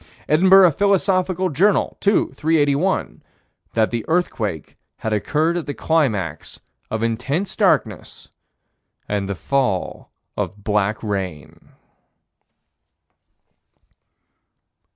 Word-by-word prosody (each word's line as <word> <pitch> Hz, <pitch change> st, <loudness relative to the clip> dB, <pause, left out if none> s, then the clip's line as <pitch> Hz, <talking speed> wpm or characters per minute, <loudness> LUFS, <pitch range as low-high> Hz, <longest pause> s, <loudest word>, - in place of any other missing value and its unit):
Edinburgh 185 Hz, +3 st, +6 dB
Philosophical 185 Hz, 0 st, +1 dB
Journal, 190 Hz, +7 st, +1 dB
2 200 Hz, 0 st, +2 dB
381: 155 Hz, +3 st, 0 dB, 0.5 s
That 110 Hz, -1 st, +1 dB
the 115 Hz, -2 st, -2 dB
earthquake 110 Hz, -, -2 dB, 0.2 s
had 110 Hz, -, -3 dB
occurred 155 Hz, -, 0 dB
at 170 Hz, -, -5 dB
the 145 Hz, -, -4 dB
climax 110 Hz, -, -1 dB, 0.3 s
of 110 Hz, 0 st, -3 dB
intense 135 Hz, -, -2 dB
darkness -, -, 0 dB, 0.8 s
and 100 Hz, -1 st, -2 dB
the 100 Hz, -, -2 dB
fall 105 Hz, 0 st, -2 dB, 0.3 s
of 105 Hz, -1 st, -5 dB
black 105 Hz, +1 st, 0 dB
rain. 95 Hz, -8 st, -5 dB
140 Hz, 90 wpm, -20 LUFS, -, 0.8 s, Edinburgh